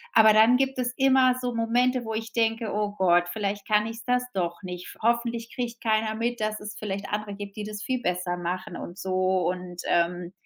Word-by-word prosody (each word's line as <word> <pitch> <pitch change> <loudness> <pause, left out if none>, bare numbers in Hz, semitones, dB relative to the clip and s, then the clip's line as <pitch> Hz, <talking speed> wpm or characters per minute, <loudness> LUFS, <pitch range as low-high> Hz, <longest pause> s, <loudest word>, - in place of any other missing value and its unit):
Aber 220 -1 +8
dann 220 +4 +6
gibt 270 0 0
es 250 -1 -1
immer 265 -2 +4
so 245 -1 -2
Momente, 245 +2 +1
wo 225 - -3
ich 225 0 -4
denke: 225 -1 0
„Oh 210 0 -1
Gott, 175 -2 +3
vielleicht 205 -2 -3
kann 210 0 +3
ich's 225 0 -7
das 250 0 +2
doch 170 -2 -2
nicht. 180 -2 -7
Hoffentlich 235 0 0
kriegt 240 -2 -4
keiner 220 -1 +1
mit, 235 +2 -2
dass 215 0 -1
es 210 0 -7
vielleicht 200 -1 -4
andere 210 0 -3
gibt, 200 -1 -8
die 210 - -3
das 210 -1 -6
viel 255 -1 -1
besser 180 -2 -1
machen 175 0 -4
und 175 - -8
so.“ 185 -1 +1
Und, 180 -1 -5
ähm, 175 +1 +1
215 Hz, 205 wpm, -26 LUFS, 185-235 Hz, -, Aber